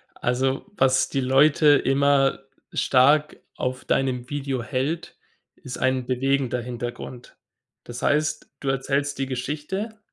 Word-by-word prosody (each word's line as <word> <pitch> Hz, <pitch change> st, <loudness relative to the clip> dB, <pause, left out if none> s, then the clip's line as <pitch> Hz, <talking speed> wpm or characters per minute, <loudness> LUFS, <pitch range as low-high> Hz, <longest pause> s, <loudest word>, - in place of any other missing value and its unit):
Also 130 Hz, +2 st, -1 dB
was 130 Hz, 0 st, +3 dB
die 135 Hz, -, -1 dB
Leute 140 Hz, +4 st, +4 dB
immer 135 Hz, 0 st, +2 dB, 0.3 s
stark 145 Hz, +4 st, +3 dB, 0.2 s
auf 130 Hz, 0 st, -3 dB
deinem 125 Hz, -2 st, 0 dB
Video 135 Hz, -4 st, -3 dB
hält, 140 Hz, +6 st, -3 dB, 0.4 s
ist 125 Hz, -1 st, -8 dB
ein 130 Hz, -1 st, 0 dB
bewegender 130 Hz, -1 st, 0 dB
Hintergrund. 120 Hz, 0 st, -7 dB, 0.5 s
Das 120 Hz, +1 st, -7 dB
heißt, 150 Hz, +1 st, 0 dB
du 135 Hz, -, -2 dB
erzählst 140 Hz, +1 st, -1 dB
die 135 Hz, -, 0 dB
Geschichte, 150 Hz, -, -4 dB
135 Hz, 120 wpm, -24 LUFS, 125-145 Hz, 0.5 s, Leute